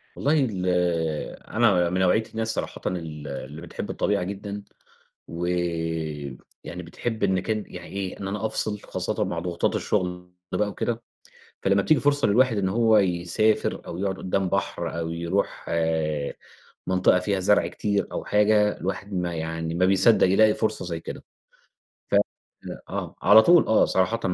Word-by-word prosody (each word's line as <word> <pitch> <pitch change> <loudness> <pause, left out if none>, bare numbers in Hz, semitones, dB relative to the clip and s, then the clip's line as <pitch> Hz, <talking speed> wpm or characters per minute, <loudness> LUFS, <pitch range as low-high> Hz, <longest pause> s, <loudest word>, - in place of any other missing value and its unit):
والله 145 +3 +1 0.2
ال 95 -3 -4 0.8
أنا 100 -7 +3
من 90 +2 -1
نوعية 95 +4 +3
الناس 110 0 -1
صراحةً - - -4
ال 80 -4 -5
اللي 70 +3 -7
بتحب 85 - -7
الطبيعة 100 -2 0
جدًا، 100 +2 -6 0.6
و 85 +1 -4 1.2
يعني 90 +1 -7
بتحب 110 +6 -4
إن 95 -2 +2
كان 110 +2 -2
يعني - - -9
إيه، 95 -1 -5
إن 95 - -4
أنا 105 +2 -3
أفصل 110 -1 -1
خاصةً - - -2
مع 85 - -3
ضغوطات 85 0 -1
الشغل 90 -3 -2 0.2
بقى 105 +3 0
وكده، 115 +2 -3 0.6
فلمّا 100 0 +3
بتيجي 155 +8 +3
فرصة 145 0 +2
للواحد 120 +2 +3
إن 95 -2 +1
هو 110 +2 +4
يسافر، 95 +3 +1
أو 85 - -6
يقعد 95 0 -1
قَُدّام 95 0 -1
بحر 90 -3 -2
أو 80 0 -3
يروح 85 +4 -2 1.2
منطقة 90 0 +3
فيها 95 +1 -1
زرع 105 +3 +3
كتير 100 -2 -1
أو - - -4
حاجة، 105 0 +3
الواحد 100 +1 -4
ما 90 -2 -2
يعني 80 0 -3
ما 90 +2 +3
بيصدّق 95 +3 +5
يلاقي 105 +3 +5
فرصة 110 - -1
زي 85 -2 -4
كده - - -8 0.9
ف - - +3 0.7
آه، - - -4
على 105 +4 +8
طول 175 +5 +5
آه، 110 - +4
صراحةً 100 +5 +1
95 Hz, 155 wpm, -25 LUFS, 90-105 Hz, 1.2 s, على